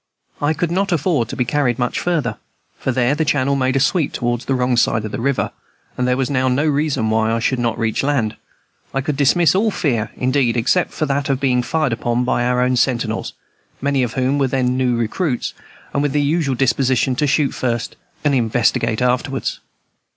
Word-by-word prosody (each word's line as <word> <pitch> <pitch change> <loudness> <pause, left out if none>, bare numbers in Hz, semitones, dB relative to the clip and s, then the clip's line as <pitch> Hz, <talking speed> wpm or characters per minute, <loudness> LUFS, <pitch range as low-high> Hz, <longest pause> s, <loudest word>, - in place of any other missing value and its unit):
I 150 +2 +1
could 170 +2 -1
not 195 +2 0
afford 155 - +1
to - - -5
be 125 - 0
carried 125 -2 0
down 125 - +1
much - - -3
farther, 150 -11 -1 0.4
for - - -1
there 125 +1 +2
the 155 +2 0
channel 140 -2 +1
made 130 -1 0
a - - +3
sweep 150 +2 +1
toward 120 -1 -1
the 135 - -1
wrong 125 0 +1
side 110 -2 +2
of 110 - -5
the - - -4
river; 140 +1 0 0.4
but 125 - -1
there 125 0 +1
was 135 -2 0
now 130 -2 0
no 130 +4 +1
reason 145 -7 0
why 110 0 +2
I 115 - +1
should 120 +2 0
not 115 -2 0
reach 110 -1 0
land. 135 -6 0 0.6
I 135 - +1
could 150 +1 -2
dismiss 150 +5 +3
all 210 +4 +2
fear, 125 - -1
indeed, 130 -2 +1
except 130 +10 +1
that 140 -2 -1
of 135 -2 +1
being 130 -3 +2
fired 145 +1 0
upon 120 +1 -1
by 125 -1 0
our 125 0 +1
own 125 0 +2
sentinels, 120 -3 0 0.5
many 140 -1 +1
of 120 -2 -1
whom 130 +2 0
were 135 - +2
then 125 -1 0
new 130 -2 +1
recruits, 125 - -1 0.4
and 140 - +1
with 145 -1 0
the 145 - +2
usual 145 -2 +1
disposition 130 0 +1
to 150 - +1
shoot 145 -1 +2
first 120 -2 -2 0.3
and 145 -2 +2
investigate 115 -1 +1
afterwards. 125 +2 -1
130 Hz, 210 wpm, -19 LUFS, 120-145 Hz, 0.6 s, a